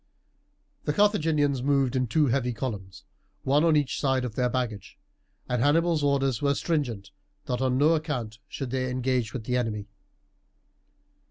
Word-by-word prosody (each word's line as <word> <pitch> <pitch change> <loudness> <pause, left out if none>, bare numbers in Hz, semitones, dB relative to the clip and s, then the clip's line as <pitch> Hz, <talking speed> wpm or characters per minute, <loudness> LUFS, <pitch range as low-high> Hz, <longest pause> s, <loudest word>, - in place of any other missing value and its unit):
The 150 - 0
Carthaginians 155 - +2
moved 135 -2 +1
in 130 -1 +1
two 150 +7 +2
heavy 125 -1 0
columns, 105 -6 -6 0.4
one 145 +3 +3
on 165 -2 +4
each 145 -3 0
side 130 -2 +1
of 120 - -5
their 125 +1 +1
baggage, 120 -5 -4 0.5
and 125 -1 0
Hannibal's 160 +3 +3
orders 135 -4 +1
were 140 -1 +2
stringent 130 - -2 0.3
that 125 0 -2
on 130 -1 +1
no 150 +4 +4
account 130 -9 -3
should 135 -4 -5
they 130 -1 -1
engage 125 -2 -1
with 125 - -5
the 125 +3 0
enemy. 105 -4 -3
130 Hz, 155 wpm, -27 LUFS, 120-145 Hz, 0.5 s, on